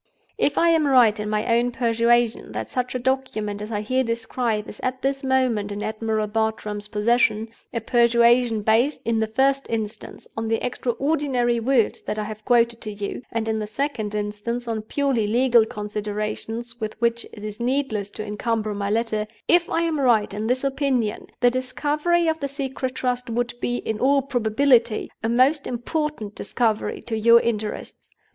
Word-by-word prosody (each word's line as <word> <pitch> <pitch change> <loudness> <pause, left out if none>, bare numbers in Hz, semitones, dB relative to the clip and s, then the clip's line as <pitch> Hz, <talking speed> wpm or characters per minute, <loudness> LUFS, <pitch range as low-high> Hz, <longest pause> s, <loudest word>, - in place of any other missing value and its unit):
"If 290 - +1
I 340 - +4
am 320 -3 +3
right 240 -6 +5
in 210 0 -3
my 215 0 0
own 240 +1 +2
persuasion 235 -1 +1
that - - -5
such 250 0 -2
a - - +2
document 240 -5 -2
as 210 +2 -6
I 210 -1 -1
here 255 +5 +1
describe 230 -2 -2
is - - -10
at 255 0 -3
this 275 +1 -1
moment 255 -6 +1
in 205 +1 -4
Admiral 220 0 -1
Bartram's 210 -1 -2
possession—a 225 +1 0
persuasion 235 -1 +3
based, 230 +7 +2
in 230 0 +1
the 220 - +1
first 270 +5 +1
instance, 220 -2 -5
on 225 0 -3
the 225 0 0
extraordinary 250 -1 0
words 235 -1 +1
that 215 - -4
I 215 - -1
have 215 0 -7
quoted 235 -1 +3
to 215 - -5
you; 205 +2 -5
and, 225 -1 -2
in 220 0 0
the 210 - -3
second 220 -3 -3
instance, 210 +4 -3
on 225 -2 -2
purely 245 -1 0
legal 235 0 +4
considerations 215 +3 -4
with 215 0 -4
which 235 0 +1
it 210 - -11
is 215 +1 -6
needless 240 -5 -1
to 215 - -4
incumber 215 +1 -2
my 200 0 -2
letter—if 225 +9 0
I 335 - +1
am 325 -3 0
right 225 -6 +3
in 210 +2 -3
this 255 +2 0
opinion, 270 -5 0
the 245 -1 +5
discovery 295 +7 0
of 320 0 0
the 280 - -2
Secret 265 -2 -4
Trust 250 -1 -2
would 240 +1 -1
be, 245 - -1
in 220 -2 -3
all 275 +1 +3
probability, 240 -2 +2
a 225 - -1
most 260 +5 +3
important 245 -2 -3
discovery 220 +1 -1
to 230 - -3
your 230 +2 +6
interests. 215 -2 -4
235 Hz, 175 wpm, -23 LUFS, 215-255 Hz, -, your